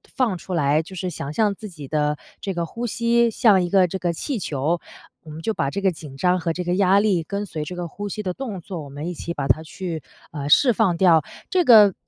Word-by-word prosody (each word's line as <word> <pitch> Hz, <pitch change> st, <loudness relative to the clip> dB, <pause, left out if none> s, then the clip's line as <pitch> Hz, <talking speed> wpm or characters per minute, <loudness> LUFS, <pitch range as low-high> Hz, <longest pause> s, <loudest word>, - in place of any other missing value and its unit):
放 230 Hz, -9 st, +1 dB
出 185 Hz, -, -7 dB
来， 150 Hz, -2 st, +2 dB
就 190 Hz, +4 st, -11 dB
是 185 Hz, 0 st, -3 dB
想 145 Hz, -4 st, -5 dB
象 210 Hz, +2 st, +2 dB
自 215 Hz, -, -8 dB
己 150 Hz, -6 st, -10 dB
的 150 Hz, 0 st, 0 dB, 0.2 s
这 195 Hz, -, -3 dB
个 170 Hz, -1 st, -2 dB
呼 230 Hz, +8 st, -5 dB
吸 235 Hz, +1 st, +2 dB
像 210 Hz, -4 st, +4 dB
一 175 Hz, -, -2 dB
个 185 Hz, -1 st, +4 dB
这 190 Hz, -, -3 dB
个 175 Hz, -1 st, 0 dB
气 245 Hz, -, -3 dB
球， 155 Hz, 0 st, -1 dB, 0.4 s
我 155 Hz, -, -13 dB
们 155 Hz, +1 st, -8 dB
就 220 Hz, +6 st, -1 dB
把 140 Hz, -8 st, -1 dB
这 200 Hz, +7 st, -4 dB
个 190 Hz, -, +3 dB
紧 150 Hz, -4 st, -10 dB
张 180 Hz, +4 st, +2 dB
和 165 Hz, -1 st, -1 dB
这 180 Hz, -, -3 dB
个 175 Hz, 0 st, 0 dB
压 195 Hz, +1 st, +4 dB
力 190 Hz, -6 st, +2 dB
跟 200 Hz, +4 st, -4 dB
随 160 Hz, -5 st, -5 dB
这 180 Hz, -, -6 dB
个 175 Hz, -1 st, -4 dB
呼 205 Hz, +5 st, -6 dB
吸 210 Hz, -, -4 dB
的 185 Hz, -, -2 dB
动 220 Hz, -4 st, -5 dB
作， 170 Hz, -2 st, -6 dB
我 145 Hz, -, -9 dB
们 145 Hz, +4 st, -6 dB
一 -, -, -4 dB
起 170 Hz, +1 st, -5 dB
把 135 Hz, -, -3 dB
它 155 Hz, +6 st, +3 dB
去， 165 Hz, 0 st, -5 dB, 0.3 s
呃， 145 Hz, -3 st, -5 dB
释 250 Hz, -, +6 dB
放 195 Hz, -5 st, +2 dB
掉。 170 Hz, -3 st, +5 dB, 0.3 s
这 370 Hz, -1 st, +3 dB
个 210 Hz, -6 st, +8 dB
180 Hz, 280 characters per minute, -23 LUFS, 160-200 Hz, 0.4 s, 个